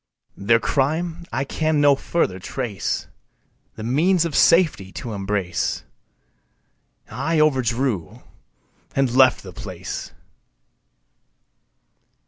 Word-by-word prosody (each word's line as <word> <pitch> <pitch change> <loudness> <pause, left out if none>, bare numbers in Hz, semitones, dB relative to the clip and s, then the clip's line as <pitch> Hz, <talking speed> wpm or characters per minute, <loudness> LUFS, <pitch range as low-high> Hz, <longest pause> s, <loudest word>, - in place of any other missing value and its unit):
Their 115 +4 +3
crime 160 +7 -1
I 130 +4 -1
can 155 +2 0
no 145 -1 +5
further 135 - -1
trace 110 0 -3 0.7
The 110 - -7
means 165 +9 +2
of 165 - -3
safety 155 - +4
to 115 -3 -6
embrace, 95 -3 -2 1.3
I 155 +8 0
overdrew 130 - 0 0.7
and 135 -3 +2
left 130 -1 +5
the 95 -2 -10
place. 95 -2 -7
130 Hz, 95 wpm, -22 LUFS, 105-155 Hz, 1.3 s, no